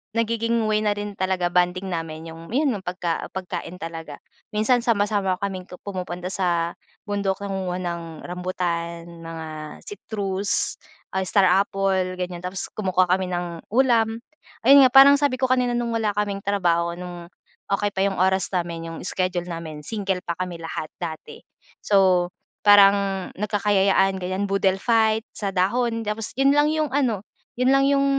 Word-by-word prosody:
nagiging 230 Hz, 0 st, +1 dB
way 215 Hz, 0 st, +2 dB
na 210 Hz, -1 st, +1 dB
rin 205 Hz, 0 st, -4 dB
talaga, 185 Hz, -2 st, 0 dB
bonding 180 Hz, +1 st, +1 dB
namin 165 Hz, -1 st, -5 dB
yung 165 Hz, +1 st, -11 dB, 0.3 s
pagka 180 Hz, -2 st, -3 dB
pagkain 180 Hz, -2 st, -5 dB
talaga. 165 Hz, -3 st, -7 dB, 0.4 s
Minsan 245 Hz, +4 st, +3 dB
sama-sama 205 Hz, -4 st, +1 dB
kaming 190 Hz, -2 st, -4 dB
pu -, -, -10 dB
pumupunta 180 Hz, -2 st, -5 dB
sa 170 Hz, -3 st, 0 dB, 0.3 s
bundok 200 Hz, -1 st, -2 dB
nangunguha 190 Hz, -2 st, -3 dB
ng 170 Hz, -1 st, -3 dB, 0.2 s
rambutan, 175 Hz, -2 st, -3 dB, 0.2 s
mga 165 Hz, -1 st, -7 dB, 0.4 s
citrus, 200 Hz, -, -3 dB, 0.3 s
ah, 190 Hz, -, -1 dB
star 200 Hz, 0 st, +3 dB
apple, 190 Hz, 0 st, +1 dB
ganiyan. 180 Hz, -1 st, -4 dB
Tapos 185 Hz, +2 st, -5 dB
kumukuha 185 Hz, -3 st, +1 dB
kami 185 Hz, 0 st, +2 dB
ng 175 Hz, -2 st, -4 dB
ulam, 230 Hz, -2 st, +3 dB, 0.5 s
ayun 275 Hz, +1 st, +8 dB
nga, -, -, -3 dB
parang 280 Hz, +1 st, +9 dB
sabi 285 Hz, -3 st, +2 dB
ko 255 Hz, 0 st, 0 dB
kanina 250 Hz, -1 st, +2 dB
nung 240 Hz, -1 st, -1 dB
wala 220 Hz, -3 st, 0 dB
kaming 205 Hz, -1 st, -1 dB
trabaho, 170 Hz, -4 st, +1 dB
no'ng 175 Hz, -1 st, -8 dB, 0.5 s
okey 205 Hz, +1 st, -1 dB
pa 190 Hz, -, -5 dB
yung 195 Hz, -, -2 dB
oras 190 Hz, +1 st, +2 dB
namin, 170 Hz, -2 st, -3 dB
yung -, -, -7 dB
schedule 180 Hz, -1 st, -2 dB
namin, 160 Hz, -3 st, -6 dB
single 195 Hz, 0 st, -2 dB
pa 170 Hz, -2 st, -3 dB
kami 180 Hz, -1 st, -3 dB
lahat 165 Hz, -1 st, -4 dB
dati. 160 Hz, -2 st, -7 dB, 0.4 s
So, 185 Hz, -3 st, +4 dB, 0.3 s
parang 205 Hz, -1 st, +8 dB, 0.4 s
nagkakayayaan, 200 Hz, -2 st, +2 dB
ganiyan, 185 Hz, +2 st, -2 dB
boodle 195 Hz, -1 st, +2 dB
fight 220 Hz, -1 st, +2 dB
sa 200 Hz, -, -2 dB
dahon. 230 Hz, +5 st, 0 dB
Tapos 210 Hz, 0 st, -3 dB
yun 275 Hz, +1 st, +5 dB
lang 295 Hz, +1 st, +4 dB
yung 310 Hz, -1 st, +1 dB
ano, 250 Hz, -8 st, +1 dB, 0.4 s
yun 250 Hz, -, +3 dB
lang 275 Hz, 0 st, +4 dB
yung 275 Hz, 0 st, +3 dB
190 Hz, 155 wpm, -23 LUFS, 180-215 Hz, 0.5 s, parang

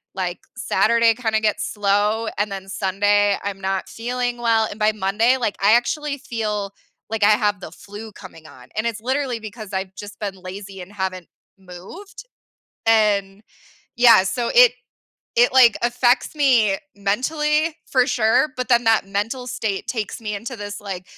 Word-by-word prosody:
like, 180 Hz, -2 st, -3 dB, 0.2 s
Saturday 230 Hz, +1 st, +3 dB
kinda 220 Hz, -2 st, -1 dB
gets 215 Hz, -1 st, 0 dB
slow, 210 Hz, +2 st, +1 dB
and 205 Hz, 0 st, -1 dB
then 195 Hz, 0 st, -6 dB
Sunday, 205 Hz, +1 st, +1 dB
I'm 200 Hz, -1 st, -5 dB
not 190 Hz, 0 st, -2 dB
feeling 245 Hz, +1 st, -3 dB
well, 230 Hz, -2 st, +2 dB
and 210 Hz, -, -9 dB
by 215 Hz, 0 st, +3 dB
Monday, 215 Hz, +5 st, +1 dB
like, 225 Hz, -5 st, -2 dB
I 205 Hz, +2 st, +6 dB
actually 285 Hz, +4 st, 0 dB
feel, 210 Hz, -7 st, -4 dB, 0.4 s
like, 220 Hz, -1 st, -2 dB
I 205 Hz, -, +6 dB
have 210 Hz, -2 st, +1 dB
the 160 Hz, -, -8 dB
flu 210 Hz, +4 st, -10 dB
coming 165 Hz, -5 st, -13 dB
on. 130 Hz, -4 st, -15 dB
And 215 Hz, +2 st, -1 dB
it's 230 Hz, -2 st, -2 dB
literally 260 Hz, -1 st, -1 dB
because 215 Hz, -1 st, -9 dB
I've 190 Hz, 0 st, -4 dB
just 205 Hz, +1 st, -10 dB
been 200 Hz, -2 st, -4 dB
lazy 190 Hz, +1 st, -9 dB
and 180 Hz, +2 st, -11 dB
haven't 190 Hz, -3 st, -4 dB, 0.3 s
moved. 195 Hz, -, -12 dB, 0.6 s
And, 205 Hz, -2 st, +2 dB, 0.5 s
yeah, 230 Hz, -5 st, +7 dB
so 235 Hz, +4 st, -2 dB
it -, -, +7 dB, 0.7 s
it, 245 Hz, +1 st, +4 dB
like, 250 Hz, -4 st, +6 dB
affects 245 Hz, +4 st, +1 dB
me 240 Hz, -9 st, +3 dB, 0.2 s
mentally, 300 Hz, +10 st, 0 dB
for 255 Hz, -2 st, +3 dB
sure, 250 Hz, +2 st, +2 dB
but, 255 Hz, -, -3 dB
then 240 Hz, -1 st, +3 dB
that 225 Hz, -3 st, +2 dB
mental 225 Hz, +6 st, -3 dB
state 215 Hz, -5 st, -3 dB
takes 215 Hz, -2 st, -4 dB
me 210 Hz, -2 st, -4 dB
into 230 Hz, +5 st, -7 dB
this, 205 Hz, 0 st, -7 dB
like 190 Hz, -3 st, -6 dB
215 Hz, 165 wpm, -21 LUFS, 195-240 Hz, 0.7 s, yeah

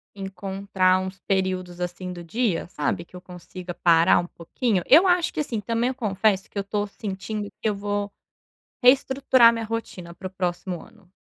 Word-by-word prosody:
Encontrar 195 Hz, -1 st, 0 dB
uns 190 Hz, 0 st, -6 dB
períodos 185 Hz, -2 st, -1 dB
assim 180 Hz, +1 st, -4 dB
do 175 Hz, -1 st, -8 dB
dia, 215 Hz, -1 st, -1 dB
sabe, 170 Hz, +1 st, -2 dB
que 180 Hz, -, -18 dB
eu 180 Hz, -, -9 dB
consiga 180 Hz, 0 st, -9 dB
parar 170 Hz, -1 st, +4 dB
um 175 Hz, -, -3 dB
pouquinho. 190 Hz, +3 st, -2 dB
Eu 335 Hz, +7 st, +7 dB
acho 355 Hz, -1 st, +2 dB
que -, -, -4 dB
assim, 240 Hz, -7 st, -2 dB
também 230 Hz, +4 st, -1 dB
eu 260 Hz, -, -4 dB
confesso 205 Hz, -4 st, +1 dB
que -, -, -9 dB
eu -, -, +1 dB
estou 205 Hz, +1 st, -2 dB
sentindo 205 Hz, +1 st, -5 dB
que -, -, 0 dB
eu 210 Hz, -, +2 dB
vou 205 Hz, 0 st, -3 dB, 0.7 s
reestruturar 260 Hz, -2 st, +5 dB
minha 230 Hz, -1 st, -3 dB
rotina 195 Hz, -6 st, -5 dB
para 185 Hz, +2 st, -7 dB
o -, -, -9 dB
próximo 180 Hz, -1 st, -3 dB
ano. 220 Hz, -5 st, -20 dB
195 Hz, 180 wpm, -24 LUFS, 180-225 Hz, 0.7 s, Eu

